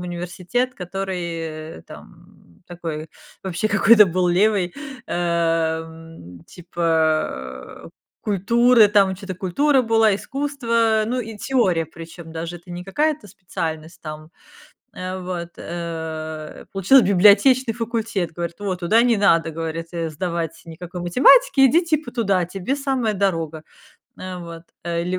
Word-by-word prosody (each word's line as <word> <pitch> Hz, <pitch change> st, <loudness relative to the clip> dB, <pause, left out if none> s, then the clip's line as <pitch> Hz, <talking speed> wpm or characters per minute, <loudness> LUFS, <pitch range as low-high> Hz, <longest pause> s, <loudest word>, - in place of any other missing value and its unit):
университет, 180 Hz, +8 st, -3 dB
который, 190 Hz, 0 st, -4 dB, 0.6 s
э, -, -, -15 dB
там -, -, -16 dB, 0.2 s
такой, 165 Hz, -3 st, -6 dB, 0.3 s
вообще 190 Hz, +2 st, -2 dB
какой-то 215 Hz, 0 st, +6 dB
был 180 Hz, 0 st, 0 dB
левый, 185 Hz, 0 st, +2 dB, 0.4 s
эм, 165 Hz, -, -2 dB
типа, 175 Hz, -1 st, -11 dB, 1.1 s
э, -, -, -10 dB, 0.3 s
культуры, 230 Hz, +4 st, +4 dB
там 200 Hz, -2 st, +3 dB
че-то 190 Hz, 0 st, -7 dB
культура 260 Hz, -, +2 dB
была, 225 Hz, -2 st, +3 dB
искусство. 230 Hz, -3 st, 0 dB
Ну, 245 Hz, +4 st, -2 dB
и 225 Hz, -2 st, -7 dB
теория, 195 Hz, -9 st, +1 dB
причём 165 Hz, +1 st, -11 dB
даже 165 Hz, +1 st, -5 dB
это 175 Hz, +1 st, -16 dB
не 175 Hz, +1 st, -6 dB
какая-то 295 Hz, +6 st, -1 dB
специальность 165 Hz, -4 st, -6 dB
там, 155 Hz, 0 st, -9 dB, 0.6 s
э, 185 Hz, +1 st, -5 dB
вот, 180 Hz, -2 st, -5 dB
э, 160 Hz, -2 st, -6 dB
получила 195 Hz, +8 st, +5 dB
библиотечный 210 Hz, +6 st, +5 dB
факультет, 225 Hz, -6 st, -2 dB
говорит: 170 Hz, 0 st, -4 dB
"Вот 190 Hz, -3 st, -3 dB
туда 215 Hz, +7 st, +4 dB
не 235 Hz, -2 st, +3 dB
надо, 170 Hz, -5 st, +3 dB
говорит, 165 Hz, +1 st, -5 dB, 0.2 s
сдавать 170 Hz, 0 st, -4 dB
никакой 175 Hz, +2 st, -8 dB
математики, 270 Hz, -, +5 dB
иди 325 Hz, +7 st, +4 dB
типа 310 Hz, -6 st, -1 dB
туда, 200 Hz, -7 st, +1 dB
тебе 195 Hz, +8 st, -3 dB
самая 265 Hz, -6 st, -1 dB
дорога". 165 Hz, -5 st, -1 dB, 0.6 s
Э, 185 Hz, -1 st, -6 dB
вот. 170 Hz, -1 st, -9 dB, 0.2 s
Э, 170 Hz, -1 st, -1 dB
в -, -, -5 dB
ль 185 Hz, +1 st, -1 dB
185 Hz, 130 wpm, -21 LUFS, 170-225 Hz, 1.1 s, какой-то